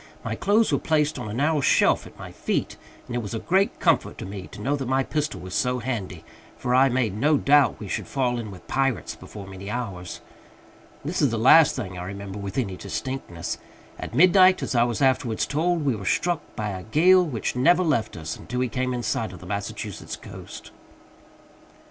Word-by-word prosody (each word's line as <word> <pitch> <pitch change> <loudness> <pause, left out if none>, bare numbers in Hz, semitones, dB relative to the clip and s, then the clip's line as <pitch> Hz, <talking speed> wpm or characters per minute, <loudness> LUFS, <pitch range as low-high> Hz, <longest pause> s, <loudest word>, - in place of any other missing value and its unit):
My - - -3
clothes 215 +2 +2
were - - +2
placed 150 -2 +1
on 115 -4 -5
a - - -5
narrow 150 +3 +2
shelf - - +3
at - - -16
my - - -9
feet, - - -2 0.3
and 120 - -6
it - - +1
was 105 0 -5
a - - -2
great 190 - +1
comfort - - +2
to - - -6
me 95 -1 -7
to - - -12
know 135 +7 0
that 135 -3 -4
my 130 +1 +2
pistol 150 +2 -2
was 90 -1 -8
so 125 0 +1
handy, 110 -9 -4 0.3
for 125 - -1
I 135 +2 +5
made 120 -6 0
no 145 +7 +3
doubt 145 +1 +4
we 105 - -7
should - - -3
fall 125 -3 0
in 110 -2 -5
with 95 -3 -12
Pirates 135 -3 0
before 100 -2 -10
many 95 +1 -8
hours. 100 -7 -5 0.9
This 165 +4 -1
is 145 - +4
the 115 - -2
last 135 +7 +6
thing 95 -8 -5
I - - -5
remember 100 +1 -6
with 100 +3 -6
any 100 -8 -1
distinctness. 100 -4 -5 0.4
At - - -6
midnight, 185 +4 +6
as - - -2
I 120 -1 +4
was 120 +3 -1
afterwards 130 -4 +2
told, 165 +1 0
we 135 -4 +2
were 100 - -7
struck 175 - +1
by 105 -2 -2
a 95 -2 -5
gale 175 - +5
which 125 - -3
never 175 +8 +4
left 115 - 0
us 80 0 -5
until 125 0 -4
we 125 - 0
came 125 +2 -1
in 120 - -3
sight 110 0 -1
of 90 - -10
the 90 - -12
Massachusetts 100 +2 -5
coast. - - -11
125 Hz, 210 wpm, -25 LUFS, 100-145 Hz, 0.9 s, last